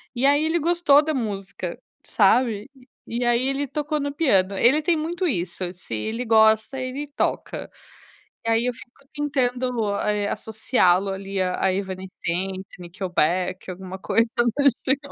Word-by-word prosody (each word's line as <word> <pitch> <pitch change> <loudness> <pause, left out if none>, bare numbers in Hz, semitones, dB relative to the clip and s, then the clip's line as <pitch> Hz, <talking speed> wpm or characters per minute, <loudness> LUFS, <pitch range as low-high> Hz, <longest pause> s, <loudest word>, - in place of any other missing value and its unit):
e 245 +3 +1
aí 285 +2 +4
ele 320 +2 +1
gostou 335 -3 +4
da 310 +1 -1
música, 195 - -4 0.3
sabe? 220 +1 +2
E 255 -1 -20 0.2
e 240 +1 -2
aí 240 +2 +2
ele 275 +1 0
tocou 300 +1 -2
no 285 0 -3
piano. 200 - +2
Ele 270 +9 +4
tem 330 +2 +2
muito 340 +4 -2
isso, 180 - -2
se 175 -11 -7
ele 225 - -3
gosta, 220 +3 +4
ele 260 +3 -4
toca. - - -2 0.7
E - - 0
aí 225 +1 +3
eu 250 - 0
fico 270 +2 -17
tentando, 250 -6 0
eh, 210 -1 0
associá-lo 200 -4 +1
ali 195 0 -3
a 180 0 -1
a 190 -1 +3
Evanescence, 190 -1 -4
Nickelback, 180 +1 -1
alguma 185 +1 -8
coisa. 225 +4 +2
Então, 240 -1 +1
deixa 280 -2 +2
em 270 - +3
225 Hz, 160 wpm, -23 LUFS, 190-275 Hz, 0.7 s, aí